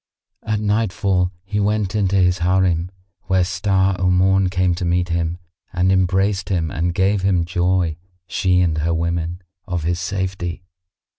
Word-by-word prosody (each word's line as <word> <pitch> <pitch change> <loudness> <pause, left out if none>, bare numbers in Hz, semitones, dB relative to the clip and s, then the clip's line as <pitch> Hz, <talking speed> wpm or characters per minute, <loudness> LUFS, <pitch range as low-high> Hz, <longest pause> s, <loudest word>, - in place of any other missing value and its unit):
At 110 -1 -2
nightfall 100 -3 0
he 105 +1 -3
went 105 -1 0
in 105 -3 +1
to 100 - -1
his 90 -1 +3
Harim, 90 -1 +1 0.4
where 95 -1 +2
Star 95 +1 +1
o' 90 0 +2
Morn 95 +1 +3
came 90 -1 +1
to 90 +2 -4
meet 90 0 0
him 85 0 -1 0.4
and 90 +1 +2
embraced 95 +2 +1
him 85 -5 -1
and 85 +2 -1
gave 95 +2 +2
him 90 -3 +1
joy, 90 -1 0 0.3
she 90 +1 +1
and 80 -3 +1
her 85 +2 0
women, 85 +2 -2 0.2
of 90 -4 -2
his 85 +1 -1
safety. 90 -1 -3
90 Hz, 160 wpm, -20 LUFS, 85-95 Hz, 0.4 s, his